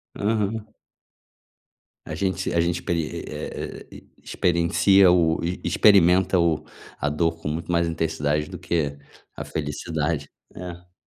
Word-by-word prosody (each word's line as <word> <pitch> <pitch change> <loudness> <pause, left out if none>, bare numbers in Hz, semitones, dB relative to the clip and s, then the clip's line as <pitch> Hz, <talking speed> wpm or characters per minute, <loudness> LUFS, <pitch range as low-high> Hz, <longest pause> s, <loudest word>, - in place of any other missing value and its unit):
aham. 110 +1 -1 1.4
A 80 - -5
gente 95 0 -1
a 85 - +2
gente 85 +1 +1
experi 85 -3 -2
é - - -6 0.3
experiencia 90 +2 +3
o 85 -2 +3 0.2
experimenta 95 -2 +5
o, 85 -2 +1 0.3
a 75 - -1
dor 80 +2 0
com - - -5
muito 80 +3 -3
mais 85 0 +2
intensidade 75 -1 -1
do 90 -2 -8
que 80 -5 -1 0.4
a - - -5
felicidade, 75 0 -3 0.2
é. 90 0 -9
85 Hz, 120 wpm, -24 LUFS, 80-90 Hz, 1.4 s, experimenta